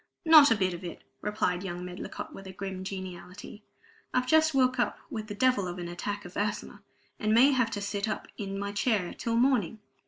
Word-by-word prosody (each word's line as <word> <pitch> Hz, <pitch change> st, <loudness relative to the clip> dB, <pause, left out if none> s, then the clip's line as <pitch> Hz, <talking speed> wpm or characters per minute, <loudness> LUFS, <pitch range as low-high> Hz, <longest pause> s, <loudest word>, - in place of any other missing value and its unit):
"Not 310 Hz, -3 st, +9 dB
a 225 Hz, -, +4 dB
bit 185 Hz, -3 st, 0 dB
of 175 Hz, -, -8 dB
it," 175 Hz, -, -7 dB, 0.2 s
replied 200 Hz, -4 st, -1 dB
young 180 Hz, -1 st, -5 dB
Medlicott, 180 Hz, 0 st, -7 dB
with 195 Hz, -, -10 dB
a -, -, -7 dB
grim 190 Hz, 0 st, -6 dB
geniality. 190 Hz, +2 st, -8 dB, 0.5 s
"I've 255 Hz, 0 st, +2 dB
just 315 Hz, +2 st, +4 dB
woke 255 Hz, -1 st, +3 dB
up 240 Hz, -, +1 dB
with 215 Hz, -1 st, -4 dB
the 205 Hz, -, -6 dB
devil 250 Hz, -4 st, +2 dB
of 175 Hz, 0 st, -5 dB
an 175 Hz, -1 st, -5 dB
attack 205 Hz, +4 st, -4 dB
of 180 Hz, -, -11 dB
asthma, 205 Hz, 0 st, -3 dB, 0.4 s
and 215 Hz, 0 st, +2 dB
may 260 Hz, +5 st, +7 dB
have 255 Hz, -4 st, +2 dB
to 205 Hz, -3 st, -4 dB
sit 200 Hz, +1 st, -2 dB
up 215 Hz, -, -4 dB
in 195 Hz, -2 st, -5 dB
my 200 Hz, 0 st, -3 dB
chair 205 Hz, -3 st, 0 dB
till 230 Hz, -1 st, -2 dB
morning. 235 Hz, -5 st, +2 dB
205 Hz, 210 wpm, -29 LUFS, 185-235 Hz, 0.5 s, Not